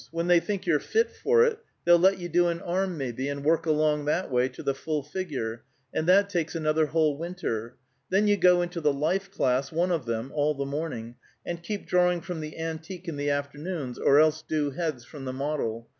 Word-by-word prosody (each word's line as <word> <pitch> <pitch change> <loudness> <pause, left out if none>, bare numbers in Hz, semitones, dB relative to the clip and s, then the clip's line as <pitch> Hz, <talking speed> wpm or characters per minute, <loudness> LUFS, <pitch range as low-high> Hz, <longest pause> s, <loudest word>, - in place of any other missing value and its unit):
When 165 +1 -2
they 175 -1 +5
think 200 +2 -4
you're 165 -4 +3
fit 450 - +1
for 465 0 +3
it, 455 -2 0 0.3
they'll 175 0 +7
let 190 +2 +4
you 175 -2 -5
do 175 +1 +3
an 170 0 -1
arm, 185 0 -1
maybe, 130 0 -3
and 140 0 -4
work 165 +1 +2
along 150 -1 +2
that 150 +2 0
way 125 +1 +2
to - - -10
the 140 - +1
full 150 +2 -3
figure; 140 -8 -4 0.3
and 160 - -1
that 200 +2 +6
takes 175 -4 -2
another 155 -1 +1
whole 150 -2 +1
winter. 145 -10 -4 0.3
Then 195 +3 +3
you 205 - +5
go 180 -2 +5
into 175 -1 -4
the 150 -1 +3
life 175 +8 -1
class, 130 -6 0
one 175 +3 +1
of 160 -7 -1
them, 115 +3 -3
all 150 0 +1
the 140 0 -3
morning, 135 -5 -4 0.3
and 170 -1 -4
keep 205 +4 -5
drawing 180 -1 +2
from 175 -1 -5
the 155 0 -7
antique 165 +3 -6
in 165 - -3
the 145 0 -1
afternoons, 145 -1 -3
or 140 +1 +5
else 155 0 +4
do 150 -2 -1
heads 145 -5 -3
from 140 -2 -9
the 130 - -3
model. 130 -5 -3
155 Hz, 220 wpm, -27 LUFS, 140-175 Hz, 0.3 s, they'll